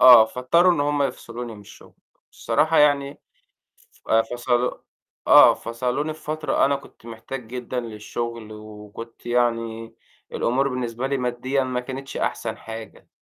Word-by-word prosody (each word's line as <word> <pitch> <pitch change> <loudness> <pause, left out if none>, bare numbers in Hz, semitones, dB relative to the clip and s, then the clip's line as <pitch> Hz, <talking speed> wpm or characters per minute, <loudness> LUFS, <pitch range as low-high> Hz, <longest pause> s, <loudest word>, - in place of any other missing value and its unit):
آه، 125 -3 +10
فاضطروا 150 +10 +3
إن 170 - -1
هم 145 0 +1
يفصلوني 120 -3 -4
من 105 - -12
الشُغل. 100 - -16 0.4
الصراحة 160 +1 +1
يعني 145 -1 +3 0.8
ف - - -19
فصلوا 120 +2 +2 0.6
آه، - - +9
فصلوني 125 +6 -2
في 155 - -16
فترة 155 +1 +1
أنا 140 - +2
كنت 140 -4 -13
محتاج 115 +2 -7
جدًا 125 +1 -4
للشُغل 115 0 -5
وكنت 105 +2 -11
يعني 115 -2 -1 0.4
الأمور 135 +3 +1
بالنسبة 125 0 -3
لي 140 0 0
مادّيًا 130 +2 -1
ما 130 -1 -2
كانتش 135 +2 -6
أحسن - - -2
حاجة. 110 0 -9
125 Hz, 135 wpm, -23 LUFS, 115-135 Hz, 0.8 s, آه